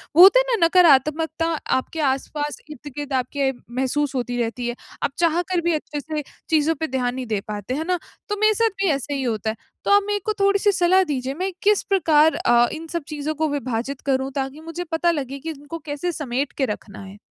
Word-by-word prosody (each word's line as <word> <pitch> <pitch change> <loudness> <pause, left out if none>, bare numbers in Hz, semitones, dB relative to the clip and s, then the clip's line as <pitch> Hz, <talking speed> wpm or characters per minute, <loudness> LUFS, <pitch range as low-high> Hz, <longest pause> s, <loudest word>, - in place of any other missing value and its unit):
वो 340 - +8
होता 400 +6 +9
है - - +2
ना, 340 - +4
नकारात्मकता 320 -1 +4 0.3
आपके 260 +5 -3
आसपास 290 +2 -2
इर्द-गिर्द 290 0 -7
आपके 265 +1 0 0.2
महसूस 270 +2 0
होती 245 -1 -2
रहती 235 +1 -2
है। 240 - -2 0.3
आप - - +1
चाह 335 0 +3
कर 355 -2 +2
भी 340 0 +1
अच्छे 300 -1 -3
से 305 +1 -4 0.3
चीज़ों 315 0 +3
पे 320 - -1
ध्यान 250 -2 -1
नहीं 260 -1 -4
दे 215 -2 0
पाते 210 +3 -4
है 310 - -2
ना? 365 -1 +2 0.3
तो 415 - -1
मेरे 430 0 +5
साथ 455 +2 +2
भी 385 - +3
ऐसे 280 0 -2
ही 275 -1 -2
होता 220 -3 -1
है। 220 - -2 0.3
तो - - +2
आप 405 0 +6
मेरे 415 0 0
को 430 - +1
थोड़ी-सी 400 +1 +3
सलाह 375 0 +4
दीजिए, 270 -5 -2
मैं 370 +6 -2
किस 420 0 +4
प्रकार 320 -5 +4
अ, 240 0 +4
इन 325 +1 -7
सब 340 -1 -3
चीज़ों 305 0 -3
को 315 +1 0
विभाजित 260 -1 -3
करूँ? 270 -1 0
ताकि 270 +2 -3
मुझे 330 +2 -5
पता 335 +1 +2
लगे 275 -3 -4
कि 325 - -6
इनको 305 +2 -7
कैसे 295 +4 -2
समेट 275 -3 -2
के 270 - +2
रखना 210 -3 -6
है? 195 +1 -11
295 Hz, 220 wpm, -22 LUFS, 265-340 Hz, 0.3 s, होता